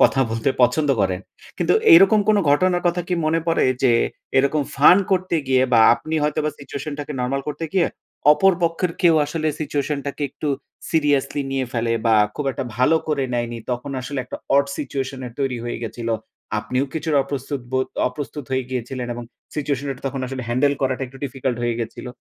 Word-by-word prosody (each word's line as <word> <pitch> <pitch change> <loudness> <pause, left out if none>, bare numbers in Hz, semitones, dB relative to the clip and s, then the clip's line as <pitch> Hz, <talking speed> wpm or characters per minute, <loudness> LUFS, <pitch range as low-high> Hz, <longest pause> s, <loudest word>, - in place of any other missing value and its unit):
কথা 135 - +4
বলতে 115 +3 0
পছন্দ 145 +5 +3
করেন। 95 -1 0 0.4
কিন্তু - - +2 0.2
এরকম 195 +4 +7
কোন 215 - +5
ঘটনার 175 +4 +3
কথা 175 +1 +1
কি 180 - +1
মনে 165 +1 +2
পড়ে 165 - +2 0.2
যে 125 -3 +5 0.5
এরকম 140 +2 +2
ফান 150 +6 +8
করতে 185 -2 +1
গিয়ে 130 -1 +4
বা 115 - +6
আপনি 155 +5 -5
হয়তোবা 150 +1 0
সিচুয়েশনটাকে 145 +1 -6
নরমাল 135 +2 -1
করতে 150 +3 -4
গিয়ে 185 -3 +3 0.5
অপর 195 +4 +4
পক্ষের 165 +1 0
কেউ 170 -2 +6
আসলে 155 +1 -1
সিচুয়েশন 145 -1 -1
টাকে 140 +1 -4
একটু 150 - -4 0.4
সিরিয়াসলি 145 -3 +1
নিয়ে 135 -1 -1
ফেলে 115 -1 0
বা 115 - +5 0.2
খুব 150 - -3
একটা 135 - -4
ভালো 130 +6 +4
করে 140 -3 +1
নেয়নি। 120 -1 -2
তখন 125 +3 -3
আসলে 130 +2 -5
একটা - - -7 0.2
অড 140 - +5
সিচুয়েশন 135 -2 -4
এর 120 - -9
তৈরি 135 -2 0
হয়ে 120 -1 -4
গেছিল। 115 0 -5 0.5
আপনিও 130 +5 -1
কিছুটা 155 -2 +1
অপ্রস্তুতবোধ 130 -2 -3 0.2
অপ্রস্তুত 140 +1 -6
হয়ে 130 0 0
গিয়েছিলেন 125 0 -4
এবং 120 0 -6 0.3
সিচুয়েশনটা 140 -3 -2
তখন 135 0 -3
আসলে 130 0 -5
হ্যান্ডেল 140 +4 +2
করাটা 130 0 0
একটু 135 +2 -14
ডিফিকাল্ট 130 -2 -3
হয়ে 120 -1 0
গিয়েছিল। 115 +2 -5
140 Hz, 175 wpm, -22 LUFS, 125-150 Hz, 0.5 s, ফান